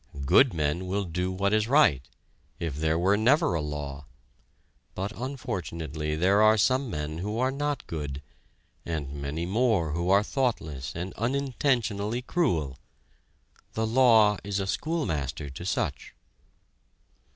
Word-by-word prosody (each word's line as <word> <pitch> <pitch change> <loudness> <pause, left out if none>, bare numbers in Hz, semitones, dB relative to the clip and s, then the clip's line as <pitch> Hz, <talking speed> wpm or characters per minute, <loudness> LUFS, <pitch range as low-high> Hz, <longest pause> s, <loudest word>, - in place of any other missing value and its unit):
Good 130 - +6
men 80 +3 -1
will 100 +2 -1
do 90 +1 -2
what 100 +2 0
is 110 0 +2
right, 135 - +4 0.6
if 80 -5 -3
there 80 +2 0
were 95 +4 +3
never 130 - +3
a 80 - 0
law; 75 -2 -5 0.9
but, 95 +3 -3
unfortunately, 85 - -4
there 95 +6 +3
are 110 +1 +6
some 130 +5 +2
men 75 -2 -4
who 105 +4 -3
are 130 +2 +1
not 145 +1 -2
good, 75 -3 -5 0.6
and 75 -4 -4
many 70 +4 -4
more 100 -5 +1
who 85 +3 -1
are 100 +2 +5
thoughtless 80 - -2
and 90 +3 -5
unintentionally 120 -3 0
cruel. 80 - 0 0.9
The 110 - 0
law 110 -3 +5
is 100 0 -2
a 95 - -1
schoolmaster 80 - -2
to 85 +6 -8
such. - - -2
95 Hz, 135 wpm, -27 LUFS, 75-120 Hz, 0.9 s, Good